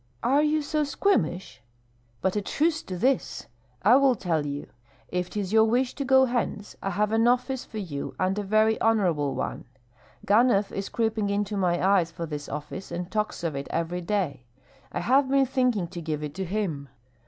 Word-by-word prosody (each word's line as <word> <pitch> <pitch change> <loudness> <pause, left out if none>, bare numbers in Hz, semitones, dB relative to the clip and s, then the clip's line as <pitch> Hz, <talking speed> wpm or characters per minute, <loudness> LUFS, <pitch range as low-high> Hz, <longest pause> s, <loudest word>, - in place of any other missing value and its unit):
"Are 275 +4 +4
you 305 0 +1
so 305 +1 0
squeamish? 195 - 0 0.6
But 190 - 0
a 210 - +1
truce 310 +9 0
to 185 - -6
this! 260 +7 0 0.4
I 230 +6 +7
will 275 -2 +4
tell 165 -7 -1
you, 145 0 -4 0.4
if 180 0 -2
'tis 205 -1 -3
your 220 0 +6
wish 245 +3 +1
to 280 - -4
go 265 0 +5
hence, 235 -4 -3
I 195 - -2
have 210 +3 0
an 225 +1 +3
office 250 +1 +1
for 220 - -9
you 160 -9 -5
and 185 +1 +1
a - - 0
very 215 +2 +2
honorable 175 -11 +2
one. 130 - -4 0.6
Ganhoff 210 -1 +3
is 195 0 -4
creeping 220 -3 0
into 205 +1 -1
my 180 -3 +1
eyes 190 -4 +3
for 165 0 -6
this 150 -2 -6
office, 150 +6 -6
and 175 +1 -5
talks 215 -4 -2
of 160 -4 -2
it 140 0 -4
every 170 +2 -2
day. 170 -10 -2 0.4
I - - -3
have 265 +2 +3
been 275 0 +4
thinking 250 -8 +1
to 170 - -7
give 155 -2 -3
it 150 -1 -5
to 190 +3 -4
him. 170 -8 -3
205 Hz, 190 wpm, -26 LUFS, 175-245 Hz, 0.6 s, I